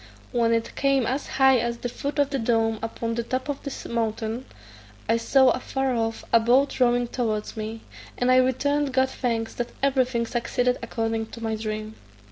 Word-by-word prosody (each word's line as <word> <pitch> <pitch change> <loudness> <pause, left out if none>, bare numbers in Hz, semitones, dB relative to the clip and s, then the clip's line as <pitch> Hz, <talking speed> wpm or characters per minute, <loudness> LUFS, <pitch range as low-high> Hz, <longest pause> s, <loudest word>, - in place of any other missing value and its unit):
When 235 -1 +2
it 230 0 -1
came 275 -3 +2
as 265 +5 -2
high 265 -1 +4
as 235 0 -2
the 245 - -4
foot 280 +5 -4
of 285 -1 +2
the 275 - -1
dome 225 -1 +1
upon 230 0 -3
the 235 - -1
top 255 +3 -3
of 285 - -3
the 280 - -6
mountain, 225 +1 -2 0.6
I 225 +2 +3
saw, 265 +3 +4
afar 265 +1 -1
off, 225 -1 -2
a 230 - +8
boat 250 +6 +2
rowing 245 -1 +3
towards 220 -4 -2
me, 220 +1 -5 0.4
and 250 +1 +2
I 255 - +6
returned 275 +2 +2
God 260 0 +2
thanks 230 -3 -2
that 240 0 -3
everything 255 -3 +2
succeeded 245 +1 0
according 225 -1 -2
to 230 +1 -10
my 220 0 -1
dream. 215 0 -4
240 Hz, 185 wpm, -25 LUFS, 225-260 Hz, 0.6 s, a